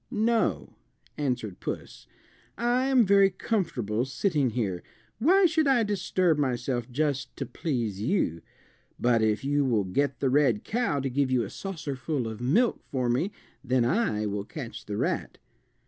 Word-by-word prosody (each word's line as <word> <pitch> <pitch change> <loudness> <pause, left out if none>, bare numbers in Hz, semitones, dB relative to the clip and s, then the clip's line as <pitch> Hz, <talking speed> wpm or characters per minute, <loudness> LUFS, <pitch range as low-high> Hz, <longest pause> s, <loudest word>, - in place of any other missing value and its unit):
"No," 230 -1 0 0.4
answered 125 -9 -2
puss, - - -6 0.5
"I 245 +2 +1
am 260 -4 +5
very 200 0 +5
comfortable 145 - -1
sitting 145 0 0
here. 100 -7 -2 0.4
Why 370 - +5
should 315 -3 +2
I 255 -4 +4
disturb 185 -5 +1
myself 125 -2 -1
just 140 +1 -1
to - - -3
please 115 - -3
you. 110 - 0 0.6
But 120 -2 +3
if 110 +1 +1
you 145 +1 +2
will 115 -6 +2
get 135 +7 -1
the 135 - +1
red 130 -6 +3
cow 230 -10 0
to 135 - -1
give 140 +1 +1
you 125 -2 +2
a - - -7
saucerful 145 - -4
of 110 0 -6
milk 195 - +2
for 130 -3 -1
me 130 - +1 0.3
then 130 -2 +2
I 120 - +1
will 100 -1 -2
catch 130 +1 -8
the 105 0 -3
rat." 170 +9 -2
140 Hz, 155 wpm, -27 LUFS, 120-195 Hz, 0.6 s, am